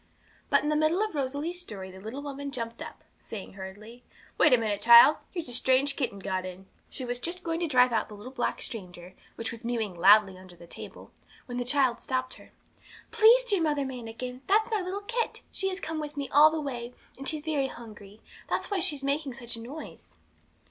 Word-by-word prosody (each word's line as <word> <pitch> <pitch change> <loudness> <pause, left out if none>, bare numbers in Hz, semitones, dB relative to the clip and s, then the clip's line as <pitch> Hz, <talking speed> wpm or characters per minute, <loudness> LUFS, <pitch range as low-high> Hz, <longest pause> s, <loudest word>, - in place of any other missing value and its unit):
But - - +4
in 295 - 0
the 300 - +1
middle 310 +6 +2
of 430 - -3
Rosalie's 290 +5 -2
story 195 - -7
the 190 - -12
little 225 +8 -7
woman 285 0 -5
jumped 230 -4 -6
up, - - -9 0.2
saying 200 -4 -8
hurriedly 205 +5 -10 0.3
'Wait - - +5
a 250 - +7
minute, 210 -3 -1
child; 235 +7 +9
here's 345 -6 -4
a 245 - -5
strange 260 +3 +2
kitten 245 -8 -2
got 190 -1 -3
in.' 185 +1 -8 0.2
She 260 - -6
was 245 0 -3
just 350 +6 -5
going 330 -1 -2
to 345 - 0
drive 250 -3 +4
out 225 - +1
the 210 - -9
little 210 +5 -10
black 245 -2 -2
stranger, 180 -4 -7 0.2
which 230 - -4
was 230 +1 -9
mewing 230 -4 -2
loudly 190 +2 +5
under 185 -1 -14
the 170 - -14
table, - - -11 0.3
when 245 -1 -5
the - - 0
child 260 -1 +1
stopped 255 0 -2
her. - - -16 0.6
'Please 455 +3 +6
dear 410 -7 +1
Mother 295 -3 +1
Manikin, 250 0 -6
that's 435 +4 +3
my 430 -2 +1
little 375 +2 -4
kit; 470 +2 -2
she 385 - -1
has 375 0 -4
come 320 -3 -4
with 300 -1 -6
me 280 -1 -2
all 295 +2 +7
the 320 0 -3
way, 245 -4 -5 0.2
and 275 - 0
she's 310 -2 -3
very 290 -4 0
hungry 215 -4 -12 0.3
that's - - -2
why 400 - +1
she 335 -5 +2
makes 280 -2 -1
such 240 -2 -4
a - - -8
noise.' 280 +7 -10
255 Hz, 215 wpm, -28 LUFS, 225-310 Hz, 0.6 s, child